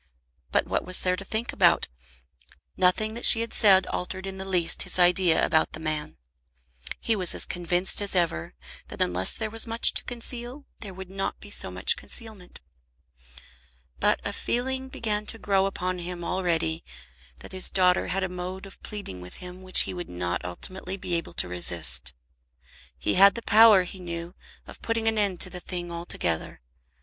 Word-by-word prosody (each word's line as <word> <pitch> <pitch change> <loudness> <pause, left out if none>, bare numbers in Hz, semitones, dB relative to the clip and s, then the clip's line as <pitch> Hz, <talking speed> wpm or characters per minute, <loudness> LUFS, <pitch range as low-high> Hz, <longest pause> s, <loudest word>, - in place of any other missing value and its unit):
But - - +1
what - - -2
was 185 0 +3
there 180 0 +1
to 195 - -9
think 220 +4 -4
about? - - +2 0.9
Nothing 195 +4 +1
that 235 - -8
she 225 - +9
had 230 - -5
said 190 -3 +5
altered 185 +1 -5
in 190 0 -7
the 190 - -6
least 180 -3 +2
his - - +1
idea 175 -1 +3
about 160 -1 0
the - - -8
man. 155 - -4 0.8
He 225 - -1
was 185 -4 +2
as - - -1
convinced 175 +3 -1
as 200 -1 -1
ever 125 - -1 0.3
that - - -11
unless 90 +1 +3
there 220 -1 -5
was 225 +1 +4
much 230 +1 +5
to - - +1
conceal 245 +3 +1
there 195 -4 -9
would 190 0 -10
not 195 0 -4
be - - -13
so - - 0
much 465 - +3
concealment. 220 - -9 1.4
But - - +2
a - - -3
feeling 260 +2 -3
began 210 -4 -3
to 225 - -1
grow 195 -3 0
upon 185 -1 -4
him 175 0 -7
already 165 -3 -2 0.6
that - - -12
his 185 -1 +2
daughter 180 -1 +2
had 190 +1 -2
a - - -1
mode 180 +1 -7
of 195 - -15
pleading 200 - -8
with 90 0 -12
him 180 +1 -11
which 185 0 +6
he - - -2
would 175 -1 -7
not 90 0 -4
ultimately 185 - -2
be 180 -2 -6
able 170 -1 -3
to - - +3
resist. 85 -9 0 0.8
He 60 - -1
had 200 +2 +6
the 235 - -6
power, 215 -3 +6
he 185 +1 -8
knew, 170 0 -7 0.3
of - - -14
putting 230 -1 -2
an 220 -1 +2
end 195 -4 0
to 185 - +2
the 180 - -8
thing 175 -1 -7
altogether. 170 - -3
185 Hz, 185 wpm, -25 LUFS, 170-210 Hz, 1.4 s, she